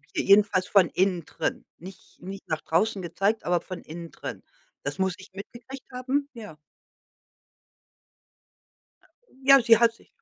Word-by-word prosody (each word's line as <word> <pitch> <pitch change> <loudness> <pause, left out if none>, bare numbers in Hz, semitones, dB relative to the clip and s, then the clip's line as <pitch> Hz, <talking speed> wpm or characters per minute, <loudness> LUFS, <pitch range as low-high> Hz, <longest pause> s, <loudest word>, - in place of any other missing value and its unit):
je - - 0
jedenfalls 200 -2 +4
von 195 -4 +4
innen 180 -3 0
drin. 160 +2 -4
Nich 185 +3 -13
nicht 195 +2 -9
nach 160 -1 -2
draußen 190 +4 0
gezeigt, 195 +6 -1
aber 175 -1 +1
von 185 -2 -8
innen 165 +1 -9
drin. - - -8 0.4
Das - - -4
muss 190 -1 0
ich 190 0 -14
mitgekriegt 245 +6 -10
haben, 270 +3 -2
ja. 210 -9 -10 2.9
Ja, 275 -1 +7
sie 230 -1 +6
hat 230 -1 +4
sich - - -23
195 Hz, 140 wpm, -26 LUFS, 180-230 Hz, 2.9 s, Ja